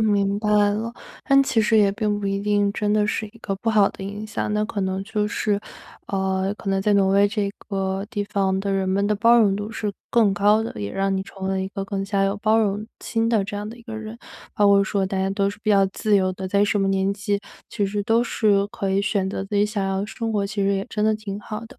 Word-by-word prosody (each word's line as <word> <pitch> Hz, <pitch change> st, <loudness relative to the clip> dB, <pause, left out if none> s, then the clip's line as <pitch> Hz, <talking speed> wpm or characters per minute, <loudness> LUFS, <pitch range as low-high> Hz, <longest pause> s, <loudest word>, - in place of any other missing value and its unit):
明 205 Hz, -1 st, +1 dB
白 210 Hz, -, -2 dB, 0.2 s
了。 225 Hz, +3 st, -3 dB, 0.3 s
但 275 Hz, -1 st, +5 dB
其 235 Hz, -5 st, +2 dB
实 220 Hz, 0 st, +3 dB
也 200 Hz, -1 st, +4 dB
并 210 Hz, -1 st, -1 dB
不 200 Hz, -, -3 dB
一 195 Hz, 0 st, -1 dB
定 205 Hz, -1 st, +1 dB
真 210 Hz, 0 st, -1 dB
的 210 Hz, -1 st, +2 dB
是 215 Hz, -, -1 dB
一 230 Hz, -, -18 dB
个 195 Hz, -, -3 dB
不 225 Hz, +3 st, -1 dB
好 205 Hz, -2 st, +4 dB
的 -, -, -11 dB
影 205 Hz, +2 st, -6 dB
响， 215 Hz, -1 st, -3 dB
那 210 Hz, 0 st, +1 dB
可 210 Hz, -2 st, -4 dB
能 190 Hz, 0 st, -1 dB
就 210 Hz, -1 st, -1 dB
是， 205 Hz, -1 st, -1 dB, 0.5 s
呃， 190 Hz, 0 st, 0 dB
可 195 Hz, -, -6 dB
能 195 Hz, 0 st, +1 dB
在 210 Hz, -, +2 dB
挪 195 Hz, -1 st, +4 dB
威 200 Hz, +1 st, +4 dB
这 205 Hz, -1 st, -1 dB, 0.2 s
个 195 Hz, 0 st, -2 dB
地 205 Hz, -4 st, -2 dB
方 190 Hz, -1 st, 0 dB
的 195 Hz, 0 st, -2 dB
人 190 Hz, -1 st, 0 dB
们 200 Hz, +2 st, +1 dB
的 210 Hz, -, +2 dB
包 230 Hz, +3 st, +5 dB
容 205 Hz, -4 st, +4 dB
度 205 Hz, +2 st, -4 dB
是 210 Hz, -2 st, -3 dB, 0.2 s
更 215 Hz, -4 st, +3 dB
高 210 Hz, +2 st, +3 dB
的， -, -, -5 dB
也 100 Hz, -, -3 dB
让 195 Hz, 0 st, 0 dB
你 190 Hz, -, -1 dB
成 195 Hz, 0 st, -10 dB
为 -, -, -1 dB
了 190 Hz, 0 st, 0 dB
一 190 Hz, -, -3 dB
个 195 Hz, 0 st, -5 dB
更 195 Hz, -1 st, -3 dB
加 195 Hz, 0 st, +1 dB
有 195 Hz, +1 st, 0 dB
包 215 Hz, +1 st, +3 dB
容 210 Hz, -1 st, 0 dB, 0.2 s
心 225 Hz, -1 st, 0 dB
的 215 Hz, -4 st, +2 dB
这 205 Hz, -, -5 dB
样 205 Hz, +1 st, -4 dB
的 230 Hz, -, -9 dB
一 235 Hz, -, -15 dB
个 225 Hz, -1 st, -7 dB
人。 220 Hz, +1 st, -7 dB, 0.3 s
包 205 Hz, -, +3 dB
括 200 Hz, 0 st, +6 dB
说 195 Hz, 0 st, 0 dB
大 195 Hz, -, -3 dB
家 190 Hz, 0 st, 0 dB
都 200 Hz, 0 st, +1 dB
是 205 Hz, +1 st, -8 dB
比 215 Hz, -, +1 dB
较 195 Hz, -1 st, +5 dB
自 205 Hz, +2 st, +1 dB
由 185 Hz, -1 st, +1 dB
的， 190 Hz, 0 st, -6 dB
在 200 Hz, +1 st, +3 dB
什 205 Hz, 0 st, +1 dB
么 195 Hz, -, +1 dB
年 195 Hz, 0 st, +1 dB
纪 200 Hz, 0 st, -1 dB, 0.3 s
其 205 Hz, -3 st, -1 dB
实 205 Hz, +1 st, -2 dB
都 225 Hz, +3 st, +2 dB
是 200 Hz, -4 st, +2 dB
可 195 Hz, -1 st, -4 dB
以 195 Hz, -, +2 dB
选 200 Hz, -2 st, 0 dB
择 195 Hz, -, -4 dB
自 205 Hz, -, -6 dB
己 205 Hz, -, +4 dB
想 210 Hz, -2 st, -2 dB
要 195 Hz, 0 st, -1 dB
的 205 Hz, -, -3 dB
生 225 Hz, 0 st, -3 dB
活， 205 Hz, -2 st, 0 dB
其 200 Hz, +1 st, -4 dB
实 195 Hz, 0 st, +2 dB
也 195 Hz, -, -2 dB
真 210 Hz, -1 st, -1 dB
的 220 Hz, -, +3 dB
挺 210 Hz, -2 st, -6 dB
好 215 Hz, +1 st, -6 dB
的， 250 Hz, +1 st, -17 dB
205 Hz, 300 characters per minute, -23 LUFS, 195-215 Hz, 0.5 s, 括